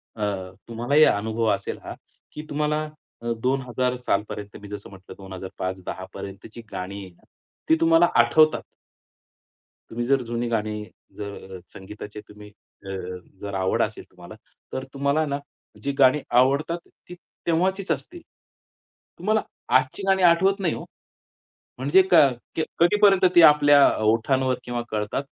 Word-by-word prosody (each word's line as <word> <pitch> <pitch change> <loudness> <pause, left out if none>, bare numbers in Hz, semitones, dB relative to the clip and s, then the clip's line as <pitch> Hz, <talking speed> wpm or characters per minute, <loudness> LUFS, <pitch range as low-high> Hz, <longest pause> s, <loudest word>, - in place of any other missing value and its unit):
अ, 105 - -4 0.4
तुम्हालाही 120 +6 +3
अनुभव 110 -1 +1
असेल - - -6
हा. - - -7 0.4
की 150 - -7
तुम्हाला 150 +1 0 0.4
अ, 120 0 -3
2000 125 -1 0
सालपर्यंत 105 0 -2
मी 105 - -10
जसं 105 0 -8
म्हटलं 95 -1 -13
2005 95 -1 -6
2010 95 0 -7
पर्यंतची 100 +4 -9
गाणी 100 +2 -6
आहे. 90 -2 -18 0.4
ती 160 - +6
तुम्हाला 165 +1 +5
आठवतात. 155 +7 +4 1.3
तुम्ही 120 +1 -3
जर 135 0 +3
जुनी 120 0 -3
गाणी 105 -2 -2 0.3
जर 100 -2 -8
संगीताची 105 +2 -9
तुम्ही 105 0 -13 0.4
अ, - - -7 0.5
जर 100 -1 -6
आवड 95 0 0
असेल - - -5
तुम्हाला - - -12 0.4
तर 130 - -3
तुम्हाला 140 +3 +1
ना 140 -1 -2 0.4
जी 140 - 0
गाणी 130 +2 +6 0.2
आवडतात 140 +6 +2 0.3
ती 180 - -8 0.3
तेव्हाचीच 185 +4 +1
असतील. 345 0 -4 1.0
तुम्हाला 215 +4 +1 0.4
आजची 130 +9 -3
गाणी 190 -1 +3
आठवत 185 +4 +4
नाही 175 -5 0
हो. - - -7 0.9
म्हणजे 145 +9 +4
क - - +7 0.4
क्य 160 - 0 0.2
कधीपर्यंत 195 +2 +5
ती 175 - +9
आपल्या 145 -2 +7 0.2
ओठांवर 130 +4 +2
किंवा 120 -1 -3
कळतात. 105 +5 -2
130 Hz, 135 wpm, -24 LUFS, 105-155 Hz, 1.3 s, ती